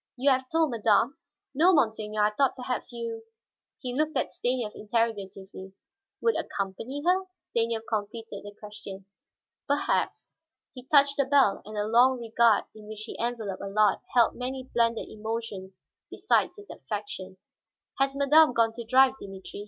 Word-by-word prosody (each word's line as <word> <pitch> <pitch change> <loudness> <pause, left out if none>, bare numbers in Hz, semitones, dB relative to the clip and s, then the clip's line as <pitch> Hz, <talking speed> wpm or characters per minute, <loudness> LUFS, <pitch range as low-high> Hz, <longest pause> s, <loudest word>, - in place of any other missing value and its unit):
"You 275 +3 +3
have 260 0 0
told 320 -3 +2
madame?" 230 +5 +2 0.3
"No, 335 +7 +5
monseigneur. 215 -5 +1
I 210 - +3
thought 270 +5 +1
perhaps 250 -1 -4
you 230 -1 -5 0.3
" - - -66
he 250 -1 -4
looked 305 +3 0
at - - -1
Stanief 245 -3 -2
interrogatively. 200 -4 -3 0.5
"Would 460 - +2
accompany 225 +9 -4
her?" 370 +2 +3 0.2
Stanief 230 -1 -1
completed 215 -1 -4
the 205 0 -10
question. 200 -2 -9 0.6
"Perhaps." 285 0 -1 0.4
He 255 -1 -11
touched 280 -1 +4
the 280 - +3
bell, 270 -7 +3
and 215 +1 -9
the 205 0 -1
long 245 +4 +4
regard 230 -2 +3
in 215 -1 -13
which 215 0 -8
he 230 - -8
enveloped 225 -5 -3
Allard 200 +1 +2 0.2
held 235 -2 +5
many 260 +1 -4
blended 230 -1 +1
emotions 215 -4 -6 0.3
besides - - +1
its 410 0 -11
affection. 200 -3 -6 0.6
"Has 275 0 +1
madame 285 0 +5
gone 230 -1 +2
to 235 - -7
drive, 260 +3 +5
Dimitri?" 195 0 -9
230 Hz, 155 wpm, -27 LUFS, 210-265 Hz, 0.6 s, No